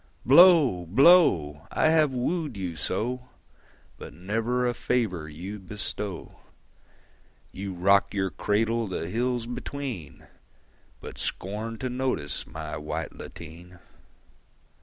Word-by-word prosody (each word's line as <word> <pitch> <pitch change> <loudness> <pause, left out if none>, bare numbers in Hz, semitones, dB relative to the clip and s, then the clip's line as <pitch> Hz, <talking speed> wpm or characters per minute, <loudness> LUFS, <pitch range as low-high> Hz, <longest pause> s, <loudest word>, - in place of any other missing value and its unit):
Blow, 140 - +6
blow! 90 - +4
I 155 - +3
have 155 -2 +4
wooed 135 - -2
you 90 -3 -4
so, 125 - -3 0.7
But - - -10
never 115 +7 -1
a 120 - 0
favour 100 -11 -1
you 90 +7 -7
bestow. 100 -1 -5 1.1
You 95 -1 -6
rock 100 +3 +3
your 95 -2 -1
cradle 115 +2 0
the 90 -3 -4
hills 120 +2 -1
between, 120 - -6 0.8
But - - -9
scorn 110 +4 -4
to 130 +1 -3
notice 125 - -2
my - - -6
white 75 0 -5
lateen. 85 +3 -11
105 Hz, 110 wpm, -26 LUFS, 90-125 Hz, 1.1 s, Blow